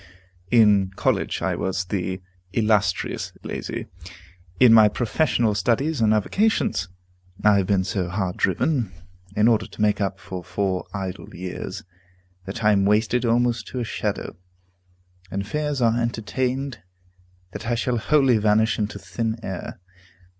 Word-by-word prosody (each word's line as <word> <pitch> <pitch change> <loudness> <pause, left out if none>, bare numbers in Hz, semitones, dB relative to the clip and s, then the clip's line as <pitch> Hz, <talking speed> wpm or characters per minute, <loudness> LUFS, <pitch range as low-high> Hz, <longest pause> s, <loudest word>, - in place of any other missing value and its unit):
In 105 -4 +5
college - - 0
I - - 0
was 95 0 -2
the 95 0 -3 0.3
"Illustrious 105 -4 0
Lazy." - - -5 0.7
In 120 -3 +7
my 110 -2 +8
professional 120 0 +1
studies 120 - 0
and 110 -1 +4
avocations, 110 - +1 0.6
I 105 -1 +6
have 95 -2 +1
been 95 -2 +2
so 90 -1 -2
hard 95 -1 -2
driven, 115 - +1 0.4
in 105 +2 +4
order 115 -2 +3
to - - -9
make 105 0 +2
up 95 -1 -1
for 95 -2 -7
four 95 -1 -2
idle 95 -2 -6
years, 90 +1 -6 0.6
that 100 +4 -6
I 105 - +5
am 100 -1 +3
wasted 110 +4 +2
almost 120 -1 +1
to 130 - -5
a - - -1
shadow, 110 - -3 0.9
and 100 +3 -3
fears 150 +2 -1
are 115 +1 +3
entertained 125 +3 -2 0.7
that 115 - -7
I 120 - +1
shall 120 +1 0
wholly 135 -3 +3
vanish 110 +2 +2
into 105 -1 -2
thin 105 +4 -3
air. 95 -2 -6
105 Hz, 140 wpm, -23 LUFS, 95-120 Hz, 0.9 s, my